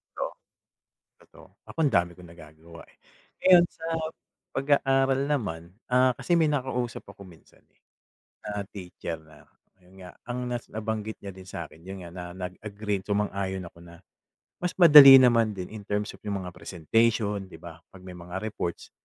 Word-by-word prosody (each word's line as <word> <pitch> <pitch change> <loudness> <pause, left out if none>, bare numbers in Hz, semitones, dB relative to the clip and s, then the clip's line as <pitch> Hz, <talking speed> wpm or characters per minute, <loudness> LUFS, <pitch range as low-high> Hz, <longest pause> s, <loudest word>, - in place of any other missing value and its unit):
Totoo, - - -3 1.0
totoo. - - -17 0.2
Ako, - - -13
ang 145 - +3
dami 85 0 +2
kong 85 -1 -14
nagagawa, 80 0 -14
eh. - - -25 0.5
Ngayon 180 -2 +7
sa 160 - -23 0.7
pag-aaral 135 -1 +2
naman, 90 - -3 0.2
ah, 125 0 +4
kasi 175 +6 0
may 160 - +3
nakausap 125 -4 -2
ako 100 - -13
minsan, 85 -3 -19
eh, - - -39 0.7
na 105 -1 -3
teacher 90 -4 -7
na, 80 -1 -19 0.4
ayun 90 +2 -21
nga. - - -11 0.2
Ang 125 - -3
nas 120 -1 -4
nabanggit 110 0 -4
niya 100 -1 -8
din 95 - -11
sa'kin 80 -1 -9
yun 95 +1 -8
nga, 85 - -9
na 90 - -6
nag-agree, 100 +2 -5
sumang-ayon 100 -2 -2
ako 85 - -17
na, 85 -1 -14 0.6
mas 180 0 -2
madali 150 -6 +10
naman 115 -3 +4
din 90 -2 -6
in 105 -2 -9
terms 105 +1 -2
of - - -15
yung 100 -2 -2
mga 90 - -7
presentation, 100 +3 0
di 90 - -13
ba, 85 -2 -11
pag 95 -1 -16
may 90 -1 -10
mga 90 +2 -7
reports. 100 -5 -5
100 Hz, 165 wpm, -26 LUFS, 90-125 Hz, 1.0 s, madali